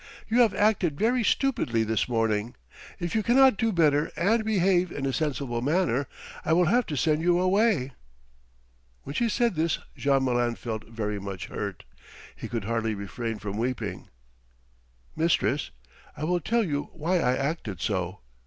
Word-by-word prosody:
"You 230 +2 +2
have 225 -4 +3
acted 195 -8 +2
very 235 +5 +2
stupidly 200 - +1
this 110 +2 0
morning. 115 -1 0 0.4
If 175 -1 -3
you 220 - +2
cannot 260 +2 +5
do 225 +3 +1
better 155 -4 +2
and 220 +7 +2
behave 185 -4 +2
in 140 - -4
a 135 - -1
sensible 135 -4 -2
manner, 145 -2 +1 0.4
I 160 - +1
will 175 +2 +4
have 240 +8 +2
to 150 - -3
send 150 +4 +2
you 175 +1 +3
away." 185 - +2 1.1
When 140 - -7
she 235 +7 +1
said 235 0 +1
this 160 -1 0 0.2
Jean 135 -1 +2
Malin 120 -2 +1
felt 110 -2 -5
very 105 -2 -3
much 95 -3 -6
hurt. - - -5 0.5
He - - -7
could 115 -3 -3
hardly 115 0 -1
refrain 110 +3 -4
from 105 0 -5
weeping. 125 +1 -3 1.1
"Mistress, 155 -3 +1 0.5
I 150 - -5
will 175 +3 +1
tell 230 +8 +1
you 145 -6 -2
why 170 +3 0
I 125 -4 +2
acted 135 - -3
so. 95 -3 -2
150 Hz, 160 wpm, -27 LUFS, 115-185 Hz, 1.1 s, cannot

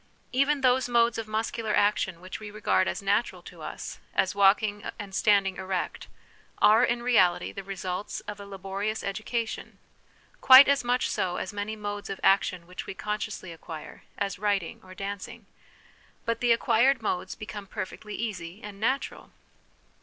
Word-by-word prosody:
Even 275 +2 +2
those 255 -1 +3
modes 235 -1 +3
of 225 - -5
muscular 220 0 -1
action 190 -4 +1
which 185 0 -7
\ve 215 -1 -8
regard 205 -3 +1
as - - -3
natural 205 +4 0
to - - -12
us, - - -7 0.2
as 190 -1 +2
walking 205 +1 +3
and 205 -3 -8
standing 195 -2 +3
erect, 185 -1 -3 0.5
are 220 +3 +6
in 240 0 +1
reality 190 -8 +3
the 195 - -6
results 190 0 -4
of 210 -1 -8
a 200 - -8
laborious 200 +2 -4
education; 220 +3 -3 0.6
quite 260 +2 +10
as 280 -1 +3
much 245 +1 +1
so 180 -1 -1
as 185 - -4
many 205 +1 -3
modes 205 -1 -5
of 195 - -5
action 185 -3 +3
which 180 +1 -8
we - - -6
consciously 210 -4 -4
acquire, 160 -1 -9 0.2
as 200 -2 -2
writing 200 -4 -1
or 185 0 -13
danc 200 0 -5
ing; 230 -3 -13 0.8
but 230 +1 -1
the 240 -1 +3
acquired 235 +2 +3
modes 180 -4 -2
become 205 -1 -8
perfectly 210 +2 -6
easy 190 -5 -5
and 205 -1 -9
natural. 260 +6 -1
205 Hz, 160 wpm, -27 LUFS, 195-230 Hz, 0.8 s, quite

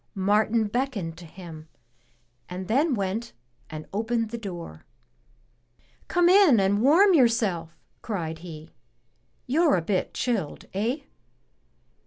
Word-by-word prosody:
Martin 215 +3 +2
beckoned 210 -7 -2
to 170 0 -12
him, 160 -2 -11 0.8
and 180 +1 -6
then 275 +5 +2
went 200 +3 -3 0.4
and 155 -1 -7
opened 225 +1 -1
the 235 - -4
door. 175 - -8 1.2
Come 350 -1 +3
in 365 - +6
and 195 +2 +2
warm 350 - +6
yourself," 220 - +2 0.2
cried 165 -7 -4
he. 160 -2 -10 0.7
"You're 305 - +3
a 175 - +1
bit 185 +2 -1
chilled, 215 - -2
eh?" 225 +9 -1
210 Hz, 115 wpm, -26 LUFS, 175-245 Hz, 1.2 s, in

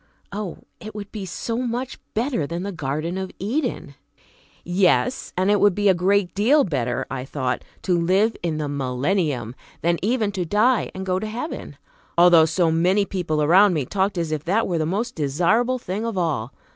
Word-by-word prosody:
Oh, 200 -3 -5 0.2
it 215 0 -9
would 205 -1 -7
be 200 -3 -6
so 225 +7 -3
much 250 +1 -3 0.2
better 225 - 0
than 170 +3 -4
the 200 - -3
garden 160 +3 -3
of 190 -1 -4
Eden! 235 - -2 0.7
Yes, 185 +8 +1
and 190 +2 +2
it 205 - +3
would 205 -3 +4
be 205 -1 +3
a - - +6
great 185 0 +1
deal 260 +9 +4
better, 125 -8 -1
I 125 -2 -3
thought, 130 -2 -3 0.2
to 180 -2 +2
live 195 +6 +2
in 165 -3 -2
the 150 -1 -2
millennium, 140 - -1 0.3
than 170 0 +2
even 215 0 +1
to 190 -2 -2
die 215 +7 +2
and 190 0 -5
go 185 0 0
to 215 - -4
heaven, 240 +9 -6 0.4
although 170 -2 +7
so 165 +1 +1
many 180 +5 +2
people 165 -6 -1
around 185 +4 +5
me 145 -4 -1
talked 195 +5 -1
as 165 -2 -1
if 155 -2 -2
that 200 +6 +1
were 175 -3 -1
the 155 - 0
most 220 +7 -2
desirable 180 - +1
thing 210 -2 -4
of 230 -4 -3
all. 145 -9 -1
185 Hz, 190 wpm, -23 LUFS, 160-210 Hz, 0.7 s, although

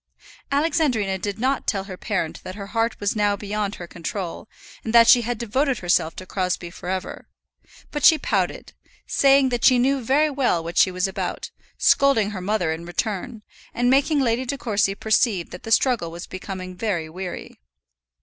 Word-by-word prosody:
Alexandrina 280 - +1
did 200 +1 -4
not 260 +3 -1
tell 195 -2 0
her 190 -1 -8
parent 185 -4 -3
that 185 - -7
her 200 -1 -7
heart 230 0 0
was 205 +1 -1
now 205 -1 +2
beyond 205 0 -3
her 175 - -8
control, 175 +3 -6 0.3
and 225 +1 -2
that 230 -1 +8
she 240 - +7
had 240 0 -3
devoted 260 +4 0
herself 175 -3 +1
to 185 - -8
Crosbie 180 -2 -2
for 175 - -8
ever; 190 0 -4 0.6
but 295 -2 -4
she 320 - +8
pouted, - - -2 0.3
saying 275 -1 +4
that 245 -1 -2
she 255 - +6
knew 265 +1 +1
very 295 +6 +2
well 250 - +1
what 170 +1 -2
she - - +5
was 185 +1 -1
about, 190 - -4 0.3
scolding 250 -7 +3
her 190 -3 -6
mother 185 -4 0
in 160 +1 -4
return, 205 +4 -4 0.3
and 245 +1 +2
making 285 +3 +3
Lady 245 -1 +1
De 275 +2 -3
Courcy 205 -5 0
perceive 210 -4 +1
that 180 - -9
the 225 - -8
struggle 230 -7 +2
was 170 +2 -8
becoming 185 -1 -7
very 180 -6 -2
weary. 180 +3 -7
210 Hz, 180 wpm, -23 LUFS, 185-250 Hz, 0.6 s, that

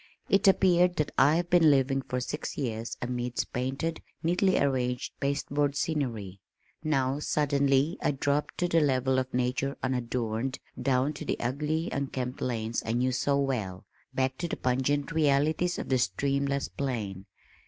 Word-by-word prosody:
It 195 0 +4
appeared 180 -2 +4
that 150 - -1
I 145 +3 +5
had 175 +1 -1
been 170 -3 +6
living 135 -1 +3
for 125 0 -3
six 140 +4 -4
years 115 -4 -3
amidst 125 0 -3
painted, 135 +6 -2 0.2
neatly 180 +3 +2
arranged 125 -3 0
pasteboard 140 0 0
scenery. 115 - -2 0.4
Now 135 -2 +1
suddenly 140 0 +1
I - - +2
dropped 145 +1 -1
to 180 - +1
the 165 -1 +3
level 130 -2 +2
of 130 0 -3
nature 125 +2 -1
unadorned, 125 0 -1 0.2
down 135 +2 +1
to 140 - -7
the - - -2
ugly 150 +7 -1
unkempt 130 -2 -3
lanes 115 -2 -1
I 115 - -2
knew 125 +2 +1
so 140 +3 +1
well, 110 -10 -2 0.3
back 130 0 -1
to 175 - -1
the - - -4
pungent 135 +3 0
realities 155 +3 +2
of - - -5
the 130 -1 +3
streamless 140 +6 0
plain. 105 -8 -4
135 Hz, 155 wpm, -28 LUFS, 125-150 Hz, 0.4 s, been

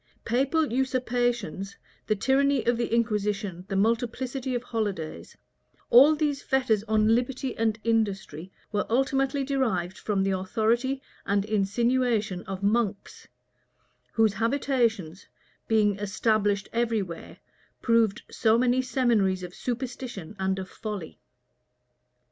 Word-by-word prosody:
Papal 275 +4 +1
usurpations, 245 -7 -1 0.3
the 215 - +2
tyranny 270 +4 +2
of 240 - +3
the 235 -1 -2
inquisition, 210 -5 -1
the 195 - -3
multiplicity 245 +5 -1
of 240 - -2
holidays; 195 - -4 0.5
all 280 +6 +8
these 295 -2 -1
fetters 255 -6 +1
on 220 0 +3
liberty 255 +1 -1
and 220 -1 0
industry 195 -7 -1 0.2
were 205 -1 -1
ultimately 270 +3 +1
derived 225 -10 -1
from 200 -3 0
the 195 - +1
authority 230 +8 0 0.2
and 200 0 +1
insinuation 215 -1 +1
of 195 0 -6
monks, 210 -1 -1 0.9
whose 220 -2 +3
habitations, 230 - 0 0.4
being 210 -3 +2
established 205 0 0
every 230 -3 +1
where, 170 -3 -9 0.5
proved 230 -3 +2
so 220 0 +3
many 250 +1 +3
seminaries 230 -8 +1
of 180 0 -7
superstition 245 -6 -5
and 190 0 0
of 190 -1 -5
folly. 205 -7 -7
225 Hz, 115 wpm, -27 LUFS, 200-250 Hz, 0.9 s, all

